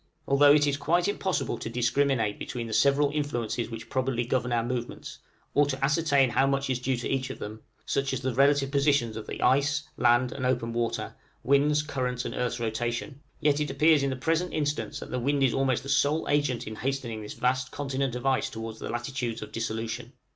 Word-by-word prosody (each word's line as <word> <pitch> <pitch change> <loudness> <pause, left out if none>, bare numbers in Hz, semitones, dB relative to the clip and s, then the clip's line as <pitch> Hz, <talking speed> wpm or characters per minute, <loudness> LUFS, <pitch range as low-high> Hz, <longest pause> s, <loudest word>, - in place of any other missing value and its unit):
Although 145 +1 +6
it 150 -1 +4
is 145 -1 0
quite 175 +5 +1
impossible 190 -2 -1
to - - -5
discriminate 120 -1 +1
between 120 -2 -4
the 110 - -5
several 140 +4 +3
influences 120 -6 -2
which 115 - -7
probably 130 -2 -1
govern 125 0 -1
our 120 -1 +1
movements, 120 0 -5 0.3
or 145 0 +4
to 135 -1 -1
ascertain 140 -3 +3
how 135 +2 +3
much 135 -1 0
is 125 - -1
due 130 0 -1
to 120 - -3
each 135 -1 -1
of 130 - -6
them 110 +1 -7 0.2
such 140 0 0
as 130 -1 -2
the 130 -1 -1
relative 140 +1 +3
positions 140 -5 +2
of 110 - -7
ice, 145 +3 +3
land, 120 +1 +3
and 135 - -5
open 120 -2 0
water, 120 0 -2 0.3
winds, 145 +2 +3
currents, 125 -4 -2
and - - -4
earth's 125 0 -2
rotation 120 +4 -3 0.2
yet 150 -1 +3
it 150 -1 -1
appears 150 +2 +4
in 140 - +1
the 130 - -2
present 165 +6 0
instance 150 -1 -2
that - - -9
the 125 - -1
wind 140 +3 +1
is 130 - +3
almost 135 -2 +1
the - - -9
sole 145 +3 +2
agent 145 -4 +1
in 110 0 -7
hastening 125 -4 -3
this 105 - -7
vast 130 +1 0
continent 135 -2 -2
of 125 - -5
ice 135 -1 +2
towards 110 0 -7
the - - -6
latitudes 120 -1 -3
of 105 - -9
its - - -25
dissolution. 115 +2 -4
130 Hz, 210 wpm, -27 LUFS, 120-145 Hz, 0.3 s, Although